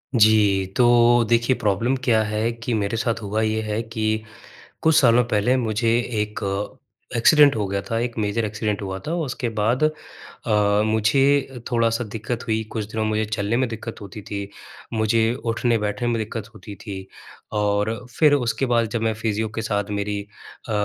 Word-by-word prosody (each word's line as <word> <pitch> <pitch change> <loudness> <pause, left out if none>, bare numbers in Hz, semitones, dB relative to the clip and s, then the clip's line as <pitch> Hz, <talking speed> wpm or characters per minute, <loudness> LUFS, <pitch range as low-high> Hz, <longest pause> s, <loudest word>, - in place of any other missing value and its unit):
जी, 105 -3 +4
तो 120 -1 +5
देखिए, 120 +2 +3
प्रॉब्लम 115 +4 +1
क्या 115 -3 +3
है 110 +2 -1
कि 115 +1 -4
मेरे 105 +1 -1
साथ 115 0 -1
हुआ 105 +1 -2
ये 110 0 0
है 110 +1 -2
कि 110 -1 -2 0.6
कुछ 160 -1 +3
सालों 125 -5 +5
पहले 120 +2 +1
मुझे 115 -1 0 0.3
एक 105 0 -4 0.8
एक्सीडेंट 145 +2 +6
हो 105 - -1
गया 100 0 -2
था, 115 +1 -3
एक 120 0 -3
मेजर 110 +2 0
एक्सीडेंट 105 0 -2
हुआ 95 -1 -4
था। 160 - -1
उसके 125 -2 -3
बाद 115 +7 +1
अ, 105 -8 -1
मुझे 135 +4 +2
थोड़ा-सा 115 0 +1
दिक्कत 110 +2 -5
हुई, 110 0 0
कुछ 110 -2 -3
दिनों 110 0 -1
मुझे 110 0 0
चलने 105 +1 -1
में 130 0 +1
दिक्कत 115 0 -7
होती 100 +1 -9
थी, 100 0 -6 0.4
मुझे 110 +1 +2
उठने-बैठने 115 -1 0
में 120 -1 +1
दिक्कत 110 0 -5
होती 105 -1 -10
थी 95 -2 -7 0.5
और 105 +2 +1 0.2
फिर 150 -2 +5
उसके 135 -1 +1
बाद 120 -2 +2
जब 115 0 -2
मैं 115 0 +1
फिज़ियो 110 0 -2
के 110 - -2
साथ 105 -2 -2
मेरी 100 0 -2 0.5
अ, - - -2
110 Hz, 170 wpm, -22 LUFS, 105-120 Hz, 0.8 s, एक्सीडेंट